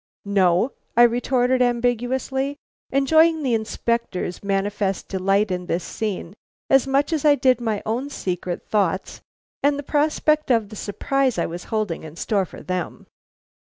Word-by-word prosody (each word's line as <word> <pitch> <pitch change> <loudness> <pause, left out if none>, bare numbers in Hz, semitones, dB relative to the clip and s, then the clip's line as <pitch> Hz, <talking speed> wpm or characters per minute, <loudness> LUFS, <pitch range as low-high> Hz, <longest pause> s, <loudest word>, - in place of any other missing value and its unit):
"No?" 195 +3 +2 0.3
I 240 - +8
retorted 245 +1 +2
ambiguously, 250 +3 0 0.3
enjoying 315 +4 +3
the 255 -3 +1
Inspector's 220 -4 -2
manifest 195 0 -1
delight 195 +2 +1
in 180 -1 -3
this 170 +1 -1
scene 200 -5 -4 0.4
as 270 0 +5
much 280 +4 +1
as 310 - -1
I 295 -1 +6
did 255 -3 +2
my 220 -3 -2
own 245 +6 -2
secret 180 -8 -4
thoughts 195 -3 -1 0.4
and 285 0 +2
the 285 - -5
prospect 305 +1 +1
of 225 -5 +2
the 215 - -9
surprise 260 +6 -1
I - - +1
was 175 +2 -6
holding 215 -7 -2
in 155 0 -10
store 195 +2 0
for - - -12
them. 185 -1 -4
230 Hz, 150 wpm, -22 LUFS, 195-270 Hz, 0.4 s, I